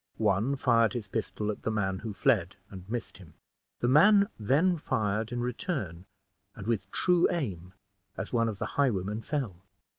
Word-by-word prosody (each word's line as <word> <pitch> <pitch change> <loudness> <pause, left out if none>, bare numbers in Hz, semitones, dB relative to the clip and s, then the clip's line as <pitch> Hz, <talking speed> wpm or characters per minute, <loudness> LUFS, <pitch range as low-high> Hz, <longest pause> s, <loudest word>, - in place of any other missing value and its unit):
One 110 +5 +1
fired 115 -5 +3
his 115 -4 -4
pistol 105 0 -2
at 105 - -8
the - - -2
man 95 -3 -1
who 110 0 -5
fled, 100 - +1 0.2
and 95 0 -10
missed 115 -3 -5
him. 80 -5 -15 0.5
The 120 - +2
man 200 - +6
then 155 - +2
fired 110 -4 -1
in 120 0 -2
return, 120 - -3 0.5
and 105 - -8
with 105 -4 -1
true 175 - +3
aim, 95 - -3 0.4
as 105 - -5
one 115 -1 +2
of 105 - -5
the - - -3 0.2
highwaymen 105 -4 0
fell. 115 - -3
110 Hz, 170 wpm, -29 LUFS, 100-130 Hz, 0.5 s, man